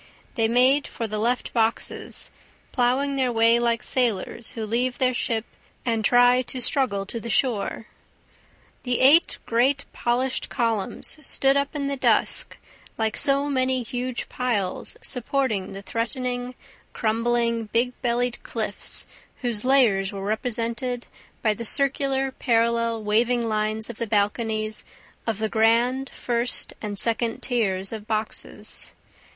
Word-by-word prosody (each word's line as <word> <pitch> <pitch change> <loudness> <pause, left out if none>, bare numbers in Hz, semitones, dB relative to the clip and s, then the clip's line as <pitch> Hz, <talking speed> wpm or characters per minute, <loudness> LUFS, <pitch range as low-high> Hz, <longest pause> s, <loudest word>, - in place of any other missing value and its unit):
They 225 -3 +1
made 255 +5 +3
for 230 - -5
the 215 -1 -3
left 240 +3 -1
boxes, 225 -1 -1 0.4
plowing 270 +3 +1
their 255 -2 +1
way 230 0 +4
like 235 -1 0
sailors 235 -2 -1
who 225 -3 -4
leave 245 +3 -1
their 255 -1 +2
ship 230 -2 -1 0.4
and 225 -2 0
try 245 +2 +5
to 255 +1 -5
struggle 240 -6 +1
to 230 +4 -5
the 235 - -7
shore. 225 -2 0 1.0
The 245 -1 -1
eight 295 +6 +5
great 260 +4 +2
polished 250 +2 -1
columns 230 +2 +1
stood 270 -1 +3
up 280 +1 -1
in 285 -1 -2
the 280 0 -2
dusk - - +1 0.4
like 220 -1 0
so 280 0 +2
many 260 -2 0
huge 245 +1 -4
piles 215 -7 -2
supporting 250 -5 -1
the 195 +1 -8
threatening, 245 +3 -2 0.4
crumbling, 230 +1 0
big 235 +4 0
bellied 245 0 0
cliffs - - +2 0.4
whose 235 -4 -1
layers 235 -8 +3
were 195 -1 -6
represented 235 +3 -2 0.4
by 215 -2 +3
the 235 - -7
circular, 270 +1 +1
parallel, 230 -2 +1
waving 230 +3 +2
lines 215 0 +1
of 235 - -8
the 230 - -2
balconies 215 +1 0 0.4
of 225 -3 0
the 220 +1 -1
grand, 235 +5 +2
first 240 0 -1
and 205 -2 -5
second 230 +2 0
tiers 195 -6 0
of 215 -1 -7
boxes. 215 -1 -3
235 Hz, 135 wpm, -24 LUFS, 220-255 Hz, 1.0 s, try